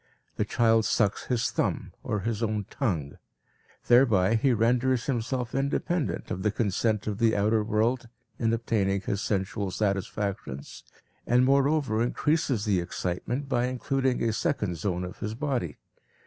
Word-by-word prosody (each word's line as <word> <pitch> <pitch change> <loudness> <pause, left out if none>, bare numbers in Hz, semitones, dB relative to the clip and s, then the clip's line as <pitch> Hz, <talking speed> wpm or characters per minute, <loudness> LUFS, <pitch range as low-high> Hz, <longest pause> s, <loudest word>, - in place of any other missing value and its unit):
The - - 0
child 115 -1 +3
sucks 105 -3 +1
his 120 -3 0
thumb - - -1
or 105 - -2
his 110 +1 -2
own 110 -3 -1
tongue. 80 - -2 0.7
Thereby 115 -6 +5
he 120 +4 +3
renders 120 +2 +2
himself 125 -1 -2
independent 140 +4 -1
of 95 - -3
the 105 - +2
consent 105 0 0
of 105 -1 -3
the 115 -1 +3
outer 105 +2 +2
world 115 +3 0 0.3
in 115 -1 +2
obtaining 105 -4 0
his 100 +1 -2
sensual 100 -1 -1
satisfactions, 100 -6 -3 0.4
and 125 +2 +4
moreover 140 -3 +2
increases 130 -2 +1
the 100 -4 +2
excitement 90 +10 -3
by 125 -2 +1
including 130 0 0
a 115 -1 +1
second 105 - -1
zone 90 +1 -2
of 90 - -7
his 105 +1 -4
body. 120 - -2
115 Hz, 145 wpm, -27 LUFS, 100-125 Hz, 0.7 s, Thereby